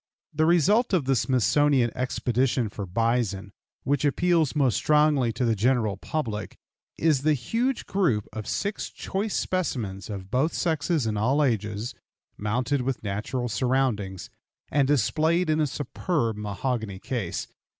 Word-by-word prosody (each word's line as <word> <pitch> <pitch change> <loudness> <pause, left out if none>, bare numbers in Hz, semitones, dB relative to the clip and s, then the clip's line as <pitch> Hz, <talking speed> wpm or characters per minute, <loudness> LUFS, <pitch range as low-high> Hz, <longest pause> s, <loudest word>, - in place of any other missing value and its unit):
The 155 +1 +2
result 200 - +3
of 170 -7 +2
the 135 0 +2
Smithsonian 130 +2 +3
expedition 125 -1 0
for 100 -1 -6
bison 110 -1 0 0.3
which 140 0 0
appeals 160 0 +2
most 135 -5 +3
strongly 150 -5 +3
to 125 - -1
the 115 -1 +2
general 110 -1 +1
public 110 - -4 0.4
is 155 -5 +2
the 155 +1 +3
huge 235 - -1
group 160 - +1
of 110 -1 -6
six 205 +1 -2
choice 200 +2 -3
specimens 115 - -2
of 95 -2 -7
both 135 +7 +1
sexes 160 -3 0
and 105 -2 -1
all 135 +7 +2
ages, 110 -3 -1 0.4
mounted 125 +6 -1
with 130 -1 -3
natural 110 +5 -2
surroundings, 110 -5 -1 0.4
and 140 -2 +3
displayed 155 - +2
in 155 - +1
a 150 - +2
superb 140 - -2
mahogany 105 0 -3
case. 105 -3 -3
130 Hz, 140 wpm, -26 LUFS, 110-155 Hz, 0.4 s, result